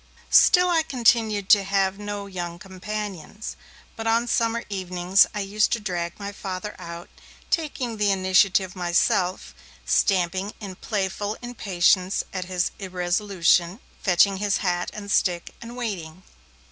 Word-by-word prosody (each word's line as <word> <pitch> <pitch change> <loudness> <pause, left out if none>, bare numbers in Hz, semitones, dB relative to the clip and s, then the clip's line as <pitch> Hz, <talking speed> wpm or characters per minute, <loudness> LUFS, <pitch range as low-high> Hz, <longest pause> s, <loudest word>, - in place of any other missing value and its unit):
Still 360 -2 +6
I 330 -2 +4
continued 230 -8 +1
to 200 -2 +6
have 195 0 0
no 205 -1 -5
young 175 -3 -6
companions. 200 +1 -6 0.4
But 225 0 -5
on 230 +1 +2
summer 230 0 0
evenings 185 -1 +2
I 210 - -3
used 205 +2 +1
to 235 - 0
drag 175 -4 -4
my 200 0 -5
Father 200 0 -6
out, 170 0 -8 0.4
taking 265 -8 -2
the 210 -1 +2
initiative 190 0 +2
myself, 180 +1 0 0.3
stamping 190 +1 +1
in 200 -3 -7
playful 205 +1 -3
impatience 190 -5 +1
at 185 -1 -3
his 180 -1 -1
irresolution, 180 0 +1 0.2
fetching 190 +1 +3
his 205 +1 0
hat 175 -1 0
and 200 -1 -7
stick, 175 -5 0
and 235 +1 -9
waiting. 185 -7 -5
195 Hz, 135 wpm, -24 LUFS, 180-210 Hz, 0.4 s, Still